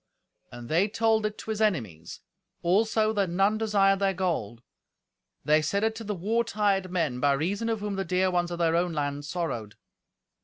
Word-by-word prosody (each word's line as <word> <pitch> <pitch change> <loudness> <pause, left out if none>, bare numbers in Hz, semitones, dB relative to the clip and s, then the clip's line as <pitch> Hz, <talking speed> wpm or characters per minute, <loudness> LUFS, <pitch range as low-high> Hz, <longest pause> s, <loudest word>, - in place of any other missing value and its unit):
And 120 0 -9
they 170 - +2
told 220 0 +1
it 210 - -8
to 220 - -6
his 215 0 -3
enemies; 110 - -2 0.4
also 215 +4 +2
that 200 -4 0
none 195 +5 +1
desired 200 -3 +3
their 195 -1 +1
gold. 140 - -2 0.8
They 155 +1 +4
said 200 +8 -1
it 220 0 +1
to 225 - -6
the 210 -1 -3
war 220 +6 0
tired 205 -4 0
men, 160 -9 -1
by 140 +1 +3
reason 195 +11 -1
of 220 -2 -2
whom 205 -1 -3
the 195 - -1
dear 185 +1 +1
ones 175 -1 0
of 175 - -4
their 165 -1 +2
own 175 0 +1
land 145 -1 -3
sorrowed. 145 - -4
185 Hz, 190 wpm, -27 LUFS, 155-210 Hz, 0.8 s, They